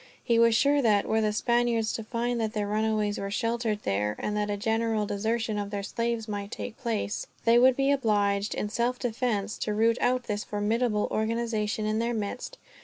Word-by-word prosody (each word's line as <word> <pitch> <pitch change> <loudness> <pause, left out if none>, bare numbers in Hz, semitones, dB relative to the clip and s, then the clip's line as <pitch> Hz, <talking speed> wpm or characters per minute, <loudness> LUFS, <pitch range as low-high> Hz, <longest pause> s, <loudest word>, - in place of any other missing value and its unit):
He 235 -1 +2
was 230 -1 +5
sure 285 +4 +4
that, 210 -5 +3
were 220 0 +1
the 215 -1 +1
Spaniards 235 0 +1
to 225 - -4
find 235 +1 -2
that 220 0 -2
their 210 -1 -1
runaways 215 0 0
were 195 - -3
sheltered 230 0 -1
there, 105 +2 0
and 210 - -3
that 210 0 -1
a 205 - -1
general 220 0 0
desertion 220 +1 -1
of 200 -1 -3
their 200 -1 -4
slaves 230 +1 -2
might 205 -1 -4
take 230 - -6
place; 225 -3 -3 0.2
they 235 +1 +6
would 255 +1 +6
be 275 +1 +2
obliged, 205 -6 +1
in 210 - -2
self 240 +3 0
defense, 225 -4 -2
to 210 - -1
root 225 +2 +3
out 250 0 +2
this 210 -2 -3
formidable 210 +1 0
organization 220 -1 -1
in 215 +1 0
their 235 +1 0
midst. 215 +3 -4
220 Hz, 195 wpm, -27 LUFS, 210-235 Hz, 0.2 s, they